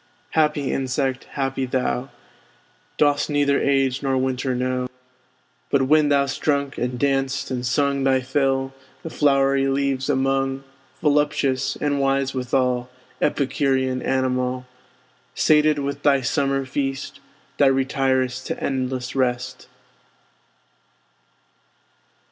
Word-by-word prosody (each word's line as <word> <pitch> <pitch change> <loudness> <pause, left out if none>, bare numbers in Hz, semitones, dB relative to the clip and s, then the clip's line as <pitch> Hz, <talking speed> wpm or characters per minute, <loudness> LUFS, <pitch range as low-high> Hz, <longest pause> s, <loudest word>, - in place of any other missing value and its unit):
Happy 150 -3 +1
insect, 130 0 -1
happy 135 -1 -2
thou! 130 0 -1 0.9
Dost 145 0 +2
neither 145 -1 +2
age 135 -2 +1
nor 135 -1 0
winter 130 0 -1
know; 125 0 -1 0.8
But, 140 -1 +2
when 150 +2 +4
thou'st 140 -1 +1
drunk, 140 -2 0
and 125 0 -2
danced, 135 0 0
and 125 -1 -2
sung 140 +2 +1
Thy 130 -1 +3
fill, 135 0 0 0.3
the 165 - -6
flowery 135 -2 +2
leaves 135 0 0
among, 135 0 0 0.4
(Voluptuous, 145 -3 +1
and 145 -1 0
wise 135 0 +1
withal, 125 -1 0 0.3
Epicurean 130 -2 0
animal!) 130 -1 -1 0.7
Sated 155 -1 +4
with 140 0 -3
thy 140 -2 +3
summer 135 +2 0
feast, 135 0 -3 0.4
Thou 140 - +6
retir'st 130 -1 0
to - - -4
endless 130 -2 -3
rest. 125 -1 -2
135 Hz, 110 wpm, -22 LUFS, 130-140 Hz, 0.9 s, Thou